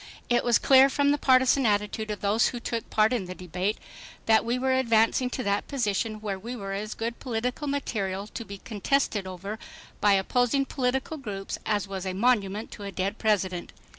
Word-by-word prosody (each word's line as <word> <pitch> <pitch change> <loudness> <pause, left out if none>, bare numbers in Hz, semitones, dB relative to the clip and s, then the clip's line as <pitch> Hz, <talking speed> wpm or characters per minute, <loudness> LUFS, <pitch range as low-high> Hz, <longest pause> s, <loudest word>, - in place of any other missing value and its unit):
It 240 0 +3
was 240 -3 +4
clear 270 0 +6
from 285 +1 +2
the 290 - +1
partisan 260 +1 +4
attitude 210 +1 0
of 210 - -4
those 210 +3 +3
who 245 - -4
took 230 -1 -4
part 215 +2 +3
in 225 -6 -1
the 185 0 -7
debate 180 +4 -2 0.5
that 220 -1 +4
we 235 +2 0
were 260 +1 +1
advancing 235 0 +3
to 255 - -4
that 200 -1 0
position 215 -4 -1
where 200 -3 -3
we 235 +5 -6
were 195 -4 -5
as 210 +2 -4
good 230 +1 -4
political 250 +4 -3
material 200 -9 -2
to 225 +2 -7
be 200 -2 -8
contested 210 -1 -1
over 195 +4 -6 0.4
by 205 -1 +4
opposing 245 +7 +2
political 265 +4 -1
groups 200 -8 -5
as 205 -2 0
was 195 -1 -5
a 185 - -2
monument 210 -1 +1
to 205 - -9
a 200 - -5
dead 190 +3 -2
President. 190 -5 0
220 Hz, 195 wpm, -27 LUFS, 200-250 Hz, 0.5 s, clear